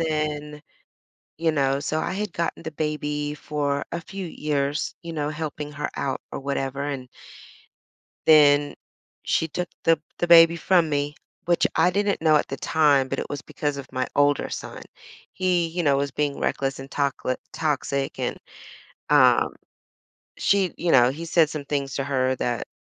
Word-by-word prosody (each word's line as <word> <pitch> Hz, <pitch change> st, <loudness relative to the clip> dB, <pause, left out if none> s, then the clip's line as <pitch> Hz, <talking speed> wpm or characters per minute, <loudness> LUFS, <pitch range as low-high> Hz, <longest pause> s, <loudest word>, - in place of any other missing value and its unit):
then 150 Hz, -2 st, -2 dB, 0.8 s
you 165 Hz, 0 st, +1 dB
know? 140 Hz, -2 st, +1 dB
So 155 Hz, +1 st, -1 dB
I -, -, -2 dB
had 210 Hz, -1 st, -3 dB
gotten 170 Hz, 0 st, -3 dB
the 160 Hz, -, -5 dB
baby 150 Hz, -1 st, -2 dB
for 145 Hz, -1 st, -2 dB
a 170 Hz, -, -2 dB
few 190 Hz, +3 st, -7 dB
years, 145 Hz, -2 st, -2 dB
you 170 Hz, -, -7 dB
know, 150 Hz, -1 st, -2 dB
helping 150 Hz, -1 st, -5 dB
her 150 Hz, +1 st, -3 dB
out 135 Hz, -1 st, -2 dB
or -, -, -4 dB
whatever, 140 Hz, 0 st, -2 dB
and 135 Hz, -3 st, -4 dB, 1.2 s
then 145 Hz, -2 st, +6 dB, 0.5 s
she 160 Hz, -, +1 dB
took 175 Hz, +3 st, -3 dB, 0.2 s
the 165 Hz, -1 st, +4 dB, 0.2 s
the 175 Hz, -, 0 dB
baby 170 Hz, 0 st, +8 dB
from 170 Hz, -2 st, +3 dB
me, 145 Hz, 0 st, -1 dB, 0.3 s
which 175 Hz, 0 st, +3 dB
I 170 Hz, +3 st, +4 dB
didn't 200 Hz, -2 st, 0 dB
know 155 Hz, -1 st, +5 dB
at -, -, +1 dB
the 135 Hz, -, -4 dB
time, 145 Hz, -4 st, +3 dB
but -, -, -3 dB
it -, -, -5 dB
was 145 Hz, -3 st, -4 dB
because 145 Hz, -1 st, -3 dB
of 140 Hz, -1 st, -7 dB
my 130 Hz, 0 st, -1 dB
older 145 Hz, 0 st, +3 dB
son. -, -, -7 dB, 0.5 s
He, 180 Hz, -2 st, +1 dB
you 175 Hz, +2 st, -2 dB
know, 140 Hz, -1 st, +4 dB
was 140 Hz, 0 st, -1 dB
being 145 Hz, 0 st, -2 dB
reckless 135 Hz, 0 st, -1 dB
and 135 Hz, +1 st, -10 dB
toxic 140 Hz, -2 st, -1 dB, 0.2 s
toxic, 140 Hz, -3 st, -1 dB
and, -, -, -2 dB, 0.7 s
um, -, -, +5 dB, 0.8 s
she 195 Hz, -3 st, +2 dB
you 175 Hz, -, +1 dB
know, 125 Hz, -1 st, +6 dB
he 155 Hz, +5 st, -6 dB
said 160 Hz, -2 st, +3 dB
some 150 Hz, -2 st, -5 dB
things 140 Hz, -2 st, -2 dB
to 135 Hz, -, -1 dB
her 130 Hz, -2 st, 0 dB
that 120 Hz, -2 st, -2 dB
150 Hz, 170 wpm, -24 LUFS, 140-165 Hz, 1.2 s, baby